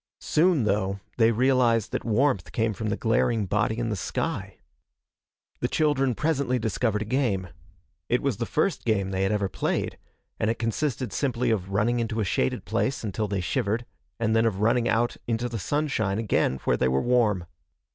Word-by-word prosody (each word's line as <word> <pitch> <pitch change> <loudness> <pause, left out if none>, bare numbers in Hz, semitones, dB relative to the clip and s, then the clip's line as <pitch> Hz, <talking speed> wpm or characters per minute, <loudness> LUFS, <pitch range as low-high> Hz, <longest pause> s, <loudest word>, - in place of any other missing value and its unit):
Soon, 165 -4 +3
though, 100 -1 0 0.2
they 115 -1 +5
realized 120 -2 +2
that - - -2
warmth 120 -3 +1
came 110 -1 0
from 110 +1 -3
the 105 - -1
glaring 115 -1 +1
body 105 +3 0
in 115 -1 -1
the 105 - -1
sky. 90 - -3 1.0
The - - 0
children 135 -5 +1
presently 140 -4 0
discovered 110 -1 0
a - - -9
game. 105 -7 0 0.6
It 125 - +1
was 135 -7 0
the 115 - -3
first 165 +3 0
game 100 -4 0
they 95 0 -1
had 95 +1 +1
ever 105 -2 +1
played, - - -2 0.4
and 110 - +1
it 115 - 0
consisted 120 +1 -2
simply 125 -3 0
of 95 -4 -1
running 105 +5 +1
into 115 -1 -2
a 105 - +1
shaded 65 -7 0
place 135 -2 -1
until 105 0 -2
they 100 -2 -1
shivered, 110 +4 -1 0.3
and 110 -1 +1
then 115 0 +4
of 100 -4 -2
running 115 +2 +2
out 120 +1 +1
into 120 +1 0
the 115 -2 -4
sunshine 110 -4 0
again 105 - +1
where - - +2
they 65 - +2
were 65 +1 +2
warm. 110 -7 +2
115 Hz, 185 wpm, -26 LUFS, 105-125 Hz, 1.0 s, they